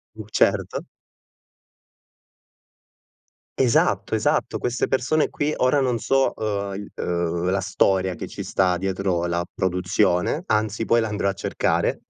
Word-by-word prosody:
U 110 -1 -8
certo. - - +1 2.7
Esatto, 125 -3 +2
esatto - - 0
queste 120 0 -1
persone 135 +4 +1
qui, 150 +1 -1
ora 130 +3 +2
non 125 -3 +1
so, 135 +4 +1
uhm, 100 -2 -2
il 100 +1 -8
uhm, 85 0 -1
la 95 +1 +1
storia 95 -1 +1
che - - -6
ci - - -7
sta 90 -2 +1
dietro 95 -1 -1
la 85 0 -1
produzione, 90 - 0
anzi 110 +1 0
poi 115 +1 +3
la 110 - 0
andrò 105 -2 -1
a - - -1
cercare 100 - -1
100 Hz, 135 wpm, -23 LUFS, 90-115 Hz, 2.7 s, poi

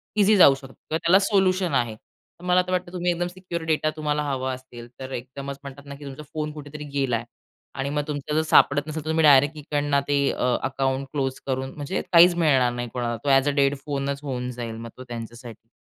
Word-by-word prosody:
Easy 210 0 +5
जाऊ 140 -7 +8
शकतं 135 -1 -12
किंवा 160 - -4
त्याला 170 +4 +4
सोल्युशन 190 -4 +2
आहे. 120 -4 +1
तर 170 - -25
मला 180 0 +4
तर - - -3
वाटतं 180 -1 -1
तुम्ही 180 -1 0
एकदम 175 0 -1
सिक्युअर 180 -2 -6
डेटा 155 -1 +1
तुम्हाला 150 -1 -1
हवा 130 -2 -2
असेल 125 -2 -10
तर 130 0 -7
एकदमच 135 +2 -6
म्हणतात 140 0 -10
ना, 140 0 -8
की 145 +1 -11
तुमचा 140 +2 -8
फोन 150 -1 -3
कुठेतरी 150 0 -8
गेला 135 -4 +1
आहे 115 +1 -3 0.5
आणि 135 +1 -1
मग 150 +1 0
तुमचं 150 0 -3
जर 155 - +4
सापडत 145 -2 +4
नसेल 155 0 -4
तर - - -3
तुम्ही 160 0 +2
डायरेक्ट 145 +1 +6
इकडनं 145 -1 0
ते 145 0 +2
अ, 125 -1 0
अकाउंट 135 0 -1
क्लोज 135 -3 -2
करून 130 0 -2
म्हणजे 150 +5 -3
काहीच 175 0 +7
मिळणार 135 -7 +3
नाही 120 0 -4
कोणाला 120 -2 -2
तो 145 - 0
ॲज 135 +1 +4
अ - - +2
डेड 140 +1 +3
फोनचं 140 0 -3
होऊन 125 -2 -3
जाईल 120 -2 -6
मग 115 +1 -7
तो 130 - -8
त्यांच्यासाठी. 120 -1 -9
140 Hz, 220 wpm, -24 LUFS, 130-155 Hz, 0.5 s, जाऊ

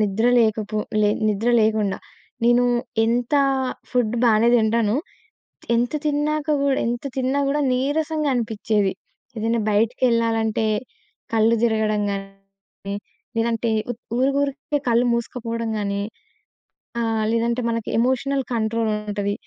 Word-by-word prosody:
నిద్ర 210 +3 +1
లేకపో 215 -1 0 0.2
లే 210 - +4 0.2
నిద్ర 215 +3 0
లేకుండా. 215 -3 +1 0.5
నేను 240 +1 +4 0.4
ఎంత 240 +4 0 0.6
ఫుడ్ 240 -2 +1
బానే 225 0 +4
తింటాను. 220 -1 +2 0.8
ఎంత 240 +1 +1 0.2
తిన్నాక 300 +1 0
గూడా 275 -1 +2
ఎంత 240 +3 -2
తిన్నా 265 +1 0
గూడా 295 +1 +1
నీరసంగనిపిచ్చేది. 250 -8 0 0.4
ఏదైనా 225 +1 0
బయటికెళ్ళాలంటే 225 0 +1 0.7
కళ్ళు 225 +1 +4
తిరగడం 220 -2 +1
గాని 195 0 -8 0.4
లేదంటే 230 0 0 0.2
ఊత్ 235 - -6 0.2
ఊరికి 270 +2 +2
ఊరికే 285 +1 -2
కళ్ళు 235 +1 +3
మూసుకుపోవడం 230 -1 -3
గానీ 200 0 -2 1.0
ఆహ్, 225 -1 0
లేదంటే 235 +1 0
మనకి 230 -1 -2
ఎమోషనల్ 260 +3 +1
కంట్రోల్ 225 0 0
ఉంటది. 205 -1 -2
230 Hz, 110 wpm, -22 LUFS, 215-245 Hz, 1.0 s, లే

